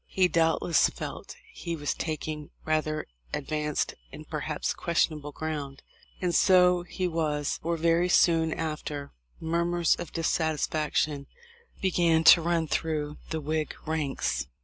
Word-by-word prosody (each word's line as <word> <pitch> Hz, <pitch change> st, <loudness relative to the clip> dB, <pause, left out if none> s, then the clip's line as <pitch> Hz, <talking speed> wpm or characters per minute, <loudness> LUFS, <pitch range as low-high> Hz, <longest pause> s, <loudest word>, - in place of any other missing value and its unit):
He 185 Hz, -1 st, +3 dB
doubtless 165 Hz, -1 st, +3 dB
felt -, -, -7 dB, 0.2 s
he 170 Hz, -1 st, -4 dB
was 145 Hz, -2 st, -2 dB
taking 155 Hz, -1 st, -4 dB, 0.2 s
rather 155 Hz, -1 st, 0 dB, 0.3 s
advanced 150 Hz, +1 st, -2 dB, 0.2 s
and -, -, -10 dB
perhaps -, -, -2 dB
ques 170 Hz, 0 st, +2 dB
tionable 150 Hz, -2 st, -8 dB
ground. 145 Hz, -3 st, -5 dB, 0.4 s
And 180 Hz, -2 st, 0 dB
so 180 Hz, -1 st, +5 dB
he 180 Hz, +1 st, -3 dB
was. 150 Hz, -4 st, -1 dB
for 170 Hz, +1 st, -1 dB
very 170 Hz, +2 st, +2 dB
soon 165 Hz, -2 st, +4 dB
after, 150 Hz, -2 st, -4 dB, 0.3 s
murmurs 170 Hz, +1 st, +1 dB
of 170 Hz, -, -6 dB
dissatisfaction 155 Hz, -3 st, 0 dB, 0.6 s
began 170 Hz, -3 st, +3 dB
to 170 Hz, -, +1 dB
run 165 Hz, -1 st, 0 dB
through 150 Hz, -1 st, -2 dB
the 160 Hz, -1 st, -2 dB
Whig 155 Hz, +1 st, -2 dB
ranks. 150 Hz, -, -1 dB
160 Hz, 125 wpm, -28 LUFS, 150-170 Hz, 0.6 s, so